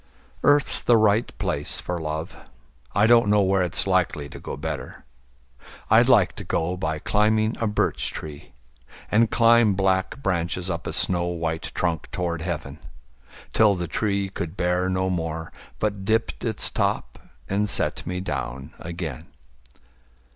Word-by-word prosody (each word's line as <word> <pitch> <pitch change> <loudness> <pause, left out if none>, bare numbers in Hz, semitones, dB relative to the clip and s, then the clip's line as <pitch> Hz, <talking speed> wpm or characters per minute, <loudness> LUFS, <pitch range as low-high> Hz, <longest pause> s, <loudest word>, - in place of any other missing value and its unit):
Earth's 145 -1 +3
the 120 - +4
right 110 +1 +2
place - - -1
for 90 -1 -4
love: 80 +1 -4 0.6
I 100 +2 +4
don't 115 -2 +5
know 105 -1 +4
where 95 0 +2
it's 90 -2 +3
likely 70 -1 0
to - - -10
go - - -6
better. 75 -4 -6 0.9
I'd - - +6
like - - +4
to - - -6
go 85 +2 -1
by 80 -4 -2
climbing 110 +5 +1
a 115 - +1
birch 105 - 0
tree, 75 -2 -9 0.6
And 110 +1 +4
climb 115 -3 +4
black 95 +7 0
branches 90 0 -1
up 85 - -4
a - - -3
snow 90 -2 +3
white 80 -2 -3
trunk 85 -3 -1
Toward 85 -2 -2
heaven, 80 -4 -5 0.7
till 105 -3 +4
the 90 -1 -4
tree 100 +2 -1
could 90 -1 -6
bear 90 +1 +1
no 95 0 0
more, 80 -2 -3 0.3
But 100 -2 -2
dipped 110 +3 0
its 110 -3 0
top - - -1 0.3
and 105 +1 0
set - - +1
me 90 +1 -3
down 70 -3 -5
again. 85 -6 -6
90 Hz, 150 wpm, -24 LUFS, 80-105 Hz, 0.9 s, I'd